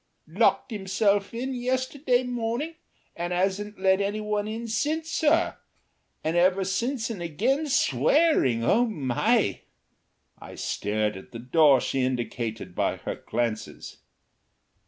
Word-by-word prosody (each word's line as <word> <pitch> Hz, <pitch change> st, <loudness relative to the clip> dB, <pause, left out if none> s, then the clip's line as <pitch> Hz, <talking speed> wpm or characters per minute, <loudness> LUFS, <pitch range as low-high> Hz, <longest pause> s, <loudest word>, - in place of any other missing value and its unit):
"Locked 265 Hz, -, +2 dB
himself 200 Hz, 0 st, +1 dB
in 255 Hz, +3 st, -3 dB
yesterday 255 Hz, +1 st, 0 dB
morning 245 Hz, +5 st, -3 dB, 0.4 s
and 175 Hz, +1 st, -3 dB
'asn't 195 Hz, +3 st, -1 dB
let 190 Hz, 0 st, +3 dB
any 205 Hz, +2 st, -1 dB
one 210 Hz, -1 st, -2 dB
in 225 Hz, +2 st, -5 dB
since, 310 Hz, +9 st, -1 dB
sir. 325 Hz, +2 st, +2 dB, 0.7 s
And 160 Hz, +2 st, -1 dB
ever 185 Hz, +2 st, +3 dB, 0.2 s
and 235 Hz, -5 st, -3 dB
again 235 Hz, -, 0 dB
SWEARING. 295 Hz, -, +3 dB
Oh, 235 Hz, -, +3 dB
my!" 135 Hz, -, +1 dB, 0.8 s
I -, -, -11 dB
stared 105 Hz, 0 st, -1 dB
at 95 Hz, -, -13 dB
the -, -, -5 dB
door 135 Hz, +3 st, +4 dB
she 135 Hz, -, -1 dB
indicated 115 Hz, -6 st, -3 dB
by -, -, 0 dB
her -, -, -4 dB
glances. 115 Hz, -2 st, -4 dB
205 Hz, 120 wpm, -26 LUFS, 150-250 Hz, 0.8 s, door